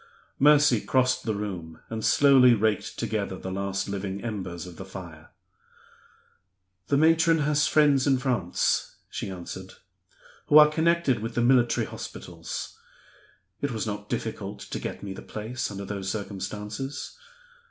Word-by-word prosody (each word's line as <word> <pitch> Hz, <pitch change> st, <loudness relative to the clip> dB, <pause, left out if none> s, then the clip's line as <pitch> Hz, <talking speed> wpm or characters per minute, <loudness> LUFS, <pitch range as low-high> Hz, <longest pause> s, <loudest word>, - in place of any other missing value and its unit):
Mercy 145 Hz, -5 st, +5 dB
crossed 130 Hz, -1 st, +1 dB
the 110 Hz, -2 st, 0 dB
room, 90 Hz, -6 st, -5 dB
and 110 Hz, -1 st, -4 dB
slowly 130 Hz, -4 st, +6 dB
raked 110 Hz, -1 st, -1 dB
together 100 Hz, -3 st, -2 dB
the 95 Hz, -, -6 dB
last 100 Hz, 0 st, -2 dB
living 100 Hz, -1 st, -4 dB
embers 90 Hz, -7 st, -5 dB
of 90 Hz, -2 st, -11 dB
the -, -, -6 dB
fire. 85 Hz, -5 st, -10 dB, 1.6 s
"The 140 Hz, -, +2 dB
matron 160 Hz, +1 st, +4 dB
has 145 Hz, 0 st, +2 dB
friends 145 Hz, -3 st, +4 dB
in 135 Hz, -2 st, +4 dB
France," 125 Hz, -9 st, 0 dB, 0.2 s
she -, -, -4 dB
answered, 95 Hz, 0 st, -8 dB, 0.7 s
"who 150 Hz, -, +7 dB
are 150 Hz, 0 st, +9 dB
connected 160 Hz, -5 st, +2 dB
with 115 Hz, +2 st, -5 dB
the 120 Hz, -, +2 dB
military 120 Hz, -1 st, +3 dB
hospitals. -, -, -7 dB, 0.8 s
It 145 Hz, -, 0 dB
was 115 Hz, -3 st, -3 dB
not 105 Hz, -1 st, -5 dB
difficult -, -, -4 dB
to -, -, -5 dB
get -, -, -6 dB
me 100 Hz, -1 st, -5 dB
the -, -, -9 dB
place, 110 Hz, +4 st, -4 dB
under 100 Hz, -1 st, -6 dB
those 100 Hz, -1 st, -4 dB
circumstances. 105 Hz, +6 st, -5 dB
110 Hz, 140 wpm, -26 LUFS, 95-135 Hz, 1.6 s, are